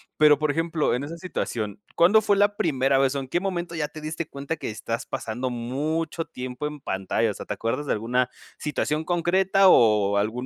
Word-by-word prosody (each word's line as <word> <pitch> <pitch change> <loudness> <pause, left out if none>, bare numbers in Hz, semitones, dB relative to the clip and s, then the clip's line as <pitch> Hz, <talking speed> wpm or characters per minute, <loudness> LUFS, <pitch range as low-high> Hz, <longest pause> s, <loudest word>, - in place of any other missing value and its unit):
Pero 150 -2 +5
por 155 -1 +1
ejemplo, 165 0 0
en 125 - -3
esa 160 +4 -6
situación, 110 - -4
¿cuándo 200 +6 +6
fue 205 -2 +2
la 205 0 +3
primera 135 -6 +2
vez, 135 0 +3
o - - 0
en 135 - -6
qué 175 +7 0
momento 175 -3 -3
ya 150 -2 -2
te 155 - -10
diste 155 +2 -4
cuenta 140 +3 -4
que - - -5
estás 115 +2 -4
pasando 125 0 -3
mucho 150 +8 -2
tiempo 130 -3 -6
en 150 0 -5
pantalla? 95 -1 -1
O - - -6
sea, - - -8
te - - -3
acuerdas 115 +6 -2
de - - -2
alguna 120 +4 0 0.3
situación 150 +1 -1
concreta, 185 +3 +3
o 105 - +5
algún 110 +5 -1
145 Hz, 205 wpm, -25 LUFS, 125-165 Hz, 0.3 s, cuándo